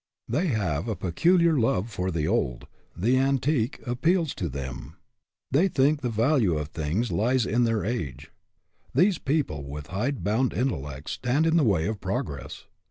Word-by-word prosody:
They 150 +11 0
have 100 - -1
a 110 - -1
peculiar 165 - +3
love 115 -1 +1
for 90 -3 -2
the 80 -4 -1
old; - - -1 0.3
the 120 +8 +2
antique 135 -2 +1
appeals 160 +6 +1
to 85 - -3
them. 65 -2 -6 0.6
They 155 +9 +4
think 145 -2 +2
the 125 - -1
value 115 - +2
of 75 -1 -4
things 85 +11 -2
lies 120 +3 +2
in 120 +2 +2
their 115 -3 0
age. 110 - -4 0.6
These 190 0 +4
people 135 - -1
with 70 +1 -7
hide 120 +1 -1
bound 110 +7 +1
intellects 70 - -3
stand 135 +6 0
in 165 0 +3
the 165 - +4
way 95 -9 +2
of 105 -2 -3
progress. - - -4
115 Hz, 165 wpm, -26 LUFS, 85-140 Hz, 0.6 s, They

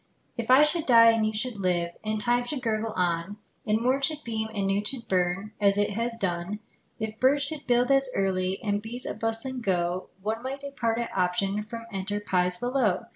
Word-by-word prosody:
If 235 -1 -5
I 260 +3 +7
should 305 +2 +2
die, 230 -2 +7
And 225 -1 +1
you - - -1
should 220 +1 -2
live, 175 -2 0
And 215 0 -2
time 245 +2 +2
should 260 +1 -3
gurgle 220 -1 -1
on, 175 +2 -1 0.3
And 215 +1 +2
morn 255 +4 +1
should 300 +2 +3
beam, 220 -1 -3
And 200 -3 -2
noon 195 +1 0
should 230 +2 -1
burn, 185 +3 -1
As 200 -1 +3
it 205 0 +1
has 230 +3 -2
usual 230 - -13
done; 180 +1 -2 0.4
If 220 0 -5
birds 280 +3 +3
should 295 0 -3
build 245 +1 +2
as 270 -1 +4
early, 190 -1 0
And 205 -1 -1
bees 235 +3 -4
as - - -5
bustling 225 +3 +2
go, 180 -3 -1
One 220 +2 -2
might 270 +2 -5
depart 245 -5 -2
at 235 0 -4
option 195 +2 0
From 230 +2 -8
enterprise 190 -2 0
below! 240 -3 0
220 Hz, 205 wpm, -26 LUFS, 195-245 Hz, 0.4 s, I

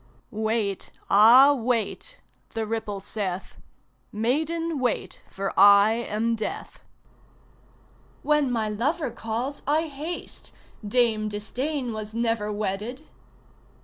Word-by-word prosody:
"Wait, 215 -2 -2 0.2
ah, 240 +8 +8
wait!" 250 - -2 0.3
the 225 -1 -1
ripple 215 -2 -3
saith; 195 -2 -5 0.5
"Maiden, 310 +8 -1
wait, 250 -2 -2
for 195 0 -4
I 200 +2 +7
am 230 0 -1
Death!" 220 - -6 1.4
"When 300 -3 +2
my 225 -3 0
lover 260 +7 -1
calls 235 +7 -4
I 305 +3 +2
haste 305 +5 -7 0.3
Dame 215 -1 +1
Disdain 250 +5 -3
was 215 0 -6
never 225 -2 0
wedded!" 210 +6 -3
225 Hz, 100 wpm, -25 LUFS, 210-270 Hz, 1.4 s, ah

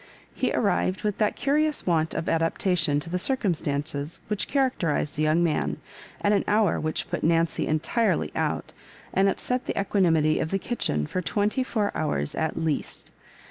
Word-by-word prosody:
He - - 0
arrived, 90 +2 +1
with 210 -2 -1
that 210 -1 +2
curious 300 +2 +1
want 160 -3 +1
of 165 - -2
adaptation 165 -2 +1
to 165 - -6
the 180 - 0
circum 225 -4 +1
stances 145 0 -3
which 210 -1 -1
characterised 215 - 0
the 150 - -2
young 155 +3 +3
man, 165 -3 0 0.4
at 205 - +2
an 205 - +3
hour 210 -3 +3
which 155 0 -2
put 175 - -2
Nancy 165 0 +2
entirely 185 +9 +1
out, - - -2 0.4
and 195 +1 +4
upset 250 +6 -2
the - - -1
equanimity 165 -6 +2
of 160 - -1
the 195 - +1
kitchen 185 - -1
for 185 - -3
twenty 210 +7 0
four 215 -5 -1
hours 75 - -1
at 160 - -2
least. 160 -3 -3
170 Hz, 170 wpm, -26 LUFS, 155-210 Hz, 0.4 s, and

